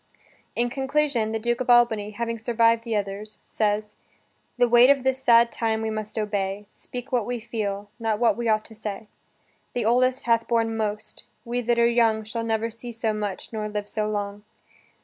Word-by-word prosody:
In 240 +1 0
conclusion, 270 -4 0
the 225 - -1
Duke 240 +3 -1
of 250 - -3
Albany, 235 -4 +4
having 230 +2 -4
survived 230 0 +2
the 230 -2 -1
others, 205 +1 -4
says: 210 0 -1 0.6
"The 245 0 +4
weight 240 +2 +7
of 280 -2 +4
this 265 0 0
sad 235 -1 +5
time 225 -1 -1
we 220 - -1
must 215 0 -5
obey; 205 -1 -2
Speak 245 0 -9
what 245 -3 +2
we 245 +2 -3
feel, 205 -3 -4
not 225 -2 0
what 235 +1 +3
we 235 -1 -1
ought 215 0 +2
to 225 - -11
say. 215 -1 -6 0.6
The 240 -3 -1
oldest 255 +3 +2
hath 230 -1 +2
borne 225 -1 +1
most: 215 -1 -4 0.2
we 240 +1 -2
that 240 0 +1
are 235 - +5
young 230 -2 +3
Shall 230 +2 -4
never 225 0 -1
see 235 +2 -8
so 225 -1 -1
much, 210 0 -5
nor 215 -1 -3
live 210 -1 -4
so 215 0 -2
long." 205 -1 -3
225 Hz, 190 wpm, -25 LUFS, 215-240 Hz, 0.6 s, weight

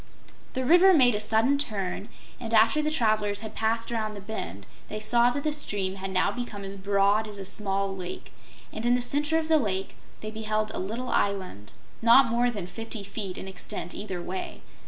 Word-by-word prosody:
The 260 -1 -2
river 355 +6 +7
made 250 -5 +6
a 210 - -1
sudden 225 +6 +2
turn, 205 -4 -2 0.3
and 230 -2 -2
after 225 +8 +5
the 305 - 0
travelers 215 -7 +1
had 220 - -7
passed 225 +1 -1
around 215 -2 -2
the - - -7
bend, 100 - -6 0.2
they 215 - -4
saw 235 +3 +4
that 280 +3 -3
the 305 - 0
stream 195 -10 -2
had 195 0 -5
now 185 -1 +2
become 230 -5 -6
as 195 0 -6
broad 200 +2 +2
as 210 -1 -9
a 195 - -6
small 195 0 -2
lake, 180 -1 -7 0.4
and 220 - -5
in 240 +1 +4
the 250 - 0
center 295 +5 +2
of 320 -1 -1
the 320 -1 +4
Lake 195 -5 -2 0.3
they 215 - -5
beheld 215 0 -2
a - - -3
little 230 +7 -4
island, 185 - -1 0.3
not 235 +1 +6
more 240 +1 +2
than 205 -7 -4
fifty 220 +3 -6
feet 200 -1 -5
in - - -6
extent, 185 -2 -6
either 190 -4 -5
way. 185 +1 -5
215 Hz, 200 wpm, -27 LUFS, 195-240 Hz, 0.4 s, river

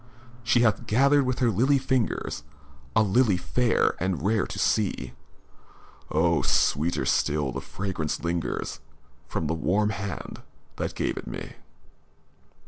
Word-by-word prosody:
III - - -22
She 120 +1 +3
has 115 -3 +3
gathered 140 +5 +4
with 130 - 0
her 120 -3 +2
lily 130 +8 +3
fingers 130 - -1 0.5
A 110 - +5
lily 105 -1 +3
fiar 115 +7 +1
and 90 -4 -1
rare 105 -1 +2
to - - -7
see. 105 -3 0 1.0
Oh! 80 +1 +2
sweeter 80 +4 +1
still 75 -3 +1
the 65 +1 -4
fragrance 90 -6 -4
lingers 85 0 -2 0.5
From 80 - -3
the 80 - 0
warm 105 +6 +1
hand 100 -3 -6 0.4
that - - -3
gave - - -1
it - - -6
me. - - -6
100 Hz, 135 wpm, -26 LUFS, 85-120 Hz, 1.0 s, A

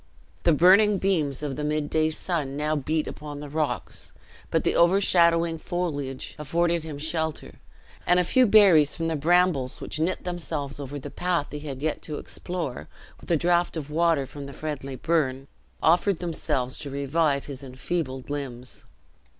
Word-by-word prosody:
The 170 - +6
burning 195 +6 +6
beams 155 -8 0
of 140 -3 -3
the 150 - -3
midday 155 +1 0
sun 155 -4 -3
now 150 +1 0
beat 155 +2 -1
upon 150 -1 -7
the 145 0 -7
rocks, 145 - -3 0.4
but - - +1
the - - +1
overshadowing 170 -2 +4
foliage 145 -8 -4
afforded 170 +3 +1
him 155 -2 -7
shelter, 160 +1 -3 0.5
and 180 +1 +5
a - - +3
few 255 +8 +4
berries 190 -9 +6
from 165 0 -2
the 160 - -1
brambles, 160 -4 +2
which - - -4
knit 170 +4 -1
themselves 160 -6 -4
over 140 0 -6
the 135 - -8
path 175 -4 -1
he 150 - -5
had 140 -2 -7
yet 155 - -1
to 150 -2 -6
explore, 150 - -5 0.3
with - - -14
a 170 - +4
draught 175 +1 +1
of 150 -1 -6
water 165 -3 +2
from 140 +1 -9
a - - -9
friendly 140 -3 -5
burn, 135 -2 0 0.4
offered 180 +3 +3
themselves 135 -7 -2
to 145 - -5
revive 140 +1 0
his 140 -2 -6
enfeebled 130 0 -4
limbs. 130 -4 -6
155 Hz, 165 wpm, -26 LUFS, 140-170 Hz, 0.5 s, The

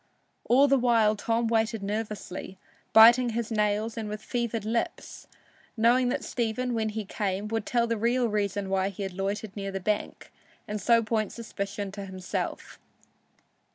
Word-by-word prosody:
All 270 +4 +5
the 275 -1 +4
while 230 -3 +3
Tom 230 +2 0
waited 225 -1 0
nervously, 205 -3 -5 0.3
biting 235 +3 +8
his 230 0 -3
nails 215 +1 0
and 220 -2 -4
with 210 +1 -6
fevered 235 -3 -2
lips, 230 +1 -3 0.5
knowing 245 +3 +4
that 250 - -2
Stephen, 245 +1 -2
when 220 -1 0
he 215 0 -4
came, 195 +1 -2
would 225 -1 -2
tell 235 -1 +2
the 230 -1 -1
real 240 +3 +2
reason 205 -2 -2
why 190 0 +1
he 200 0 -6
had 190 -1 -4
loitered 195 +2 -3
near 195 -1 -4
the 195 - -3
bank, 210 +2 -3 0.4
and 210 0 -4
so 230 +3 +4
point 215 -2 -1
suspicion 200 -3 -5
to 200 0 -7
himself. 185 -1 -5
220 Hz, 160 wpm, -27 LUFS, 200-235 Hz, 0.5 s, biting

